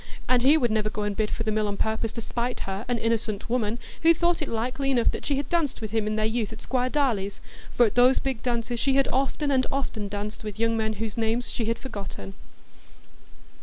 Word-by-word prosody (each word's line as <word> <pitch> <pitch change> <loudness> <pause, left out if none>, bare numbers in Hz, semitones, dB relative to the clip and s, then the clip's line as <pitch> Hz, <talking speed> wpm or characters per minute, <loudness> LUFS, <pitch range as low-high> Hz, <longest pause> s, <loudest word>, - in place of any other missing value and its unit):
And 250 -1 +4
he 280 +5 +6
would 240 -6 +1
never 215 -1 +1
go 210 -1 -3
and 205 -1 -1
bid 215 0 0
for 225 - -2
the 220 - 0
mill 215 0 +1
on 200 -1 -3
purpose 220 +1 0
to 230 - -4
spite 240 +2 -3
her, 195 +3 -4
an 245 -1 +1
innocent 225 -2 -1
woman, 230 -2 +1 0.2
who 330 +1 +6
thought 345 +1 +1
it 305 - -1
likely 250 +4 -1
enough 245 -4 +3
that - - -6
she 285 - +2
had 280 -1 -2
danced 330 -6 0
with 220 -2 -5
him 220 -1 0
in 215 - 0
their 215 0 +1
youth 220 -1 -1
at 225 - -8
Squire 255 -1 0
Darleigh's, 225 -9 0 0.3
for 240 - +4
at 215 - 0
those 250 +2 +5
big 265 -5 -2
dances 235 -1 -1
she 270 +1 +2
had 275 -1 +4
often 275 +2 +1
and 260 -1 +2
often 235 -6 -2
danced 205 +2 -5
with 210 -2 -6
young 230 0 +2
men 220 -1 0
whose 220 0 -4
names 230 +2 0
she 230 - -2
had 230 +1 0
forgotten. 195 - -7
230 Hz, 240 wpm, -26 LUFS, 215-255 Hz, 0.3 s, he